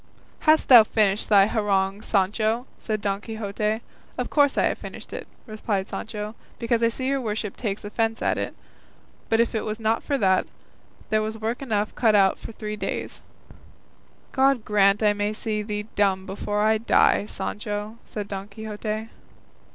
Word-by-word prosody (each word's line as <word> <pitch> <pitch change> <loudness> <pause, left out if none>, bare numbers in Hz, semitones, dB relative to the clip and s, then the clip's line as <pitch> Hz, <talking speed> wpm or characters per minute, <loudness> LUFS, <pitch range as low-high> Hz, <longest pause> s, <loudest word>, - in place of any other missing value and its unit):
"Hast 310 0 +5
thou 240 -4 +10
finished 210 -1 +1
thy 200 -2 +7
harangue, 200 -2 0
Sancho?" 215 +4 +1
said 215 -2 -3
Don 200 0 -1
Quixote. 215 0 -2 0.4
"Of - - -3
course 285 -2 +3
I - - +4
have - - 0
finished - - -9
it," - - -6 0.2
replied 215 -3 -2
Sancho, 210 -1 -5 0.2
"because 230 0 0
I 230 - +5
see 245 +3 -3
your 275 0 +1
worship 215 -3 -3
takes 205 -3 -4
offence 225 +2 -1
at - - +1
it; - - -4 0.7
but 225 - +3
if 235 - +2
it 220 - -1
was 215 0 -4
not 225 +1 +1
for 285 - -1
that, 190 -5 +2 0.6
there 215 0 +2
was 220 +1 -3
work 225 +3 -3
enough 215 -5 -1
cut 225 -3 +3
out 195 -1 +4
for - - -8
three 215 -1 -5
days." 210 - -4 1.1
"God 265 -3 +2
grant 200 0 +3
I 210 -1 +5
may 205 +1 -1
see 215 -1 -2
thee 210 0 -3
dumb 190 -2 +1
before 205 +2 -2
I 220 0 +3
die, 215 -2 +3
Sancho," 210 +2 -4
said 205 -2 -5
Don 195 0 -5
Quixote. 215 +1 -5
215 Hz, 170 wpm, -25 LUFS, 205-225 Hz, 1.1 s, thou